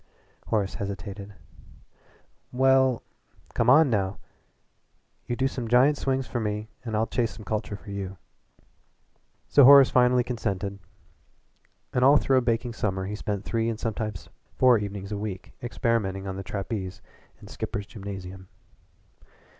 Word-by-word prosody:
Horace 100 -3 0
hesitated. 100 +1 -6 1.2
"Well 130 -1 +3 0.2
" - - -29
"Come 115 - +2
on, 140 +1 +6
now! 100 -2 0 1.1
You 120 - -1
do 130 +2 +1
some 125 -3 -5
giant 125 +5 +5
swings 135 -2 -1
for 120 - -3
me 105 0 -3
and 115 -3 -4
I'll 110 +1 +2
chase 115 -1 -1
some 110 -1 -11
culture 105 -1 -3
for 100 0 -11
you." 95 -1 -5 1.3
So 140 - +6
Horace 140 0 +9
finally 125 0 +4
consented, 100 -5 -3 1.1
and 125 - +2
all 140 +3 +7
through 135 -2 +2
a - - +4
baking 120 0 -1
summer 95 -4 -2
he 100 - -4
spent 105 -1 -4
three 115 0 0
and 110 -1 -4
sometimes 110 -4 -4 0.3
four 125 -3 +5
evenings 100 -1 -6
a 105 - -3
week 100 -3 -6
experimenting 115 -5 -1
on 95 -1 -4
the 95 - -5
trapeze 95 -1 -5 0.4
in - - -13
Skipper's 100 -1 -5
Gymnasium. 95 -3 -8
110 Hz, 145 wpm, -26 LUFS, 100-125 Hz, 1.3 s, Horace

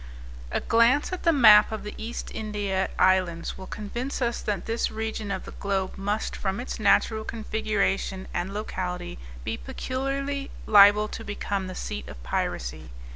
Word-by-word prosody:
A - - 0
glance 235 +9 +3
at 370 - -3
the 335 - +4
map 220 -9 +7
of 220 - -4
the 210 - -6
East 230 +2 -6
India 205 -3 -1
Islands 185 -3 +2
will 190 - -9
convince 240 +6 -4
us 240 -2 -1
that 205 -2 -2
this 230 +1 0
region 220 -1 -4
of 190 -1 -3
the - - -8
globe 195 -1 -2
must, 205 +2 -2
from 195 +1 -2
its 245 - -5
natural 220 0 +3
configuration 215 -4 -1
and 175 +2 -2
locality; 180 - -4 0.2
be - - -3
peculiarly 275 - -3 0.2
liable 210 0 +7
to 225 - -6
become 200 -2 -3
the 185 - -7
seat 70 -2 -5
of 65 -2 -10
piracy. - - -3
210 Hz, 160 wpm, -26 LUFS, 190-230 Hz, 0.2 s, map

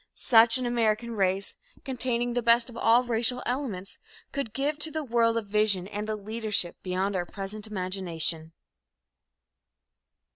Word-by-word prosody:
Such 230 -1 +5
an 255 - -2
American 235 -1 +1
race, 195 -2 -1 0.3
containing 245 -2 -1
the 245 - 0
best 235 +1 +3
of - - -13
all 230 +2 +4
racial 240 +1 0
elements, 235 -8 -4 0.3
could 275 -6 -3
give 290 +5 -1
to 315 - +1
the 315 0 -3
world 230 -3 +2
a 230 - -1
vision 205 -3 +1
and 210 +1 -5
a 215 - 0
leadership 210 -3 -3
beyond 190 +2 -1
our 175 -1 -2
present 205 +2 -6
imagination. 180 -5 -2
225 Hz, 145 wpm, -27 LUFS, 195-240 Hz, 0.3 s, Such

